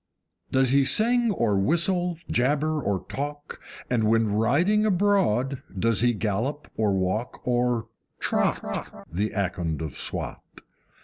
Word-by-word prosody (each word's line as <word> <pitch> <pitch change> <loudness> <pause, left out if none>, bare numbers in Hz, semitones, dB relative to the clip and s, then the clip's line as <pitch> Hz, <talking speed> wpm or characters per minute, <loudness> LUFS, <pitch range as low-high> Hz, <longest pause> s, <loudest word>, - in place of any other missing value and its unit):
Does 130 -1 +3
he 140 0 +5
sing 235 - +3
or 115 - +1
whistle, 175 - +1
jabber 150 +4 +1
or 95 -6 -2
talk, 145 +1 -6 0.3
And 120 -3 +1
when 110 -1 +2
riding 150 - +2
abroad 180 - +1 0.2
does 115 +3 +2
he 120 -1 +3
gallop 115 +8 -2
or 110 -2 +1
walk, 95 +5 -2
or 120 -2 +1 0.3
TROT, - - -2
The 100 +6 -1
Akond 85 -5 -2
of 80 -4 -5
Swat? - - -3
125 Hz, 125 wpm, -25 LUFS, 105-155 Hz, 0.3 s, he